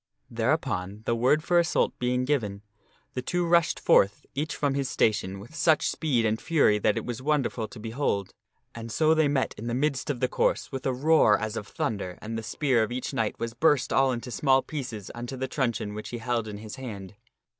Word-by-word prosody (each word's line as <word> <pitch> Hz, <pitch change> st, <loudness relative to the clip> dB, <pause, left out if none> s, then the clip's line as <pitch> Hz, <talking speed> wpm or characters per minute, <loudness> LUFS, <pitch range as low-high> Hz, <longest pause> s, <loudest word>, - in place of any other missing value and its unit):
Thereupon, 110 Hz, -, -1 dB
the -, -, +1 dB
word 130 Hz, +6 st, +2 dB
for 175 Hz, +1 st, +3 dB
assault 170 Hz, -, +1 dB
being 125 Hz, +1 st, 0 dB
given, 105 Hz, -8 st, -1 dB, 0.5 s
the 125 Hz, -, -2 dB
two 175 Hz, +7 st, -1 dB
rushed 170 Hz, -1 st, +3 dB
forth, 100 Hz, +1 st, +3 dB
each 150 Hz, +4 st, -2 dB
from 145 Hz, -2 st, 0 dB
his 135 Hz, -1 st, -1 dB
station, 100 Hz, -3 st, 0 dB
with 115 Hz, +10 st, -12 dB
such 155 Hz, 0 st, +3 dB
speed 130 Hz, -8 st, 0 dB
and 110 Hz, 0 st, 0 dB
fury 145 Hz, -10 st, +3 dB
that 105 Hz, 0 st, +2 dB
it -, -, -3 dB
was 120 Hz, 0 st, -4 dB
wonderful 135 Hz, -6 st, 0 dB
to 110 Hz, -, -12 dB
behold. 110 Hz, -3 st, -2 dB, 0.4 s
And 115 Hz, 0 st, -7 dB
so 155 Hz, +7 st, +3 dB
they 155 Hz, -2 st, +3 dB
met 140 Hz, -2 st, 0 dB
in 115 Hz, -, -5 dB
the 120 Hz, -, -1 dB
midst 140 Hz, +1 st, -1 dB
of 135 Hz, -4 st, -1 dB
the 130 Hz, -, +2 dB
course -, -, 0 dB
with 135 Hz, -1 st, -3 dB
a -, -, +2 dB
roar 130 Hz, -5 st, +4 dB
as 110 Hz, 0 st, -4 dB
of 105 Hz, -, -5 dB
thunder, 100 Hz, -5 st, -3 dB
and 110 Hz, +1 st, -6 dB
the 115 Hz, -, -3 dB
spear 130 Hz, +1 st, +1 dB
of 110 Hz, -, -1 dB
each 125 Hz, +1 st, -4 dB
knight 110 Hz, -2 st, -1 dB
was 115 Hz, 0 st, -4 dB
burst 150 Hz, -3 st, +2 dB
all 135 Hz, 0 st, +4 dB
into 125 Hz, 0 st, -5 dB
small 135 Hz, +1 st, +3 dB
pieces 120 Hz, -9 st, -6 dB
unto 120 Hz, +2 st, -6 dB
the 130 Hz, +1 st, -2 dB
truncheon 120 Hz, -6 st, -2 dB
which 105 Hz, +1 st, -6 dB
he 120 Hz, -, -4 dB
held 115 Hz, -1 st, -1 dB
in 105 Hz, -1 st, -6 dB
his 105 Hz, 0 st, -8 dB
hand. 105 Hz, -8 st, -7 dB
125 Hz, 215 wpm, -27 LUFS, 110-140 Hz, 0.5 s, roar